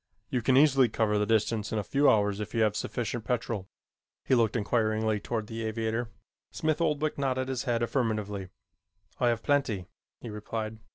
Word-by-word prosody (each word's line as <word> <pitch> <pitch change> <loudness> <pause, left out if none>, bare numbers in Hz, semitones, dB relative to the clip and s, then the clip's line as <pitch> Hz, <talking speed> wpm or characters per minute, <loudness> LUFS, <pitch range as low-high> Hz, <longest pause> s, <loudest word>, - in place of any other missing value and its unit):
You 125 - +1
can 130 +3 +3
easily 135 -4 +5
cover 105 -1 +1
the 105 - 0
distance 110 -1 +1
in 110 - -1
a 105 - 0
few 140 +8 +3
hours 105 -1 +2
if 105 +2 -5
you 115 - +3
have 105 -1 +2
sufficient 120 +1 -3
petrol." 110 -4 -2 0.6
He - - +1
looked 115 -3 +3
inquiringly 110 -1 +1
toward 110 +1 -3
the 115 +1 -5
aviator. 110 +1 -2 0.4
Smith 155 +1 -1
Oldwick 155 -2 0
nodded 130 -1 0
his 130 -2 -2
head 120 -1 +1
affirmatively. 110 -6 -1 0.7
"I 125 - +3
have 115 -2 +1
plenty," 135 -10 +1 0.3
he 115 - -7
replied. 110 +1 -5
115 Hz, 175 wpm, -29 LUFS, 105-125 Hz, 0.7 s, easily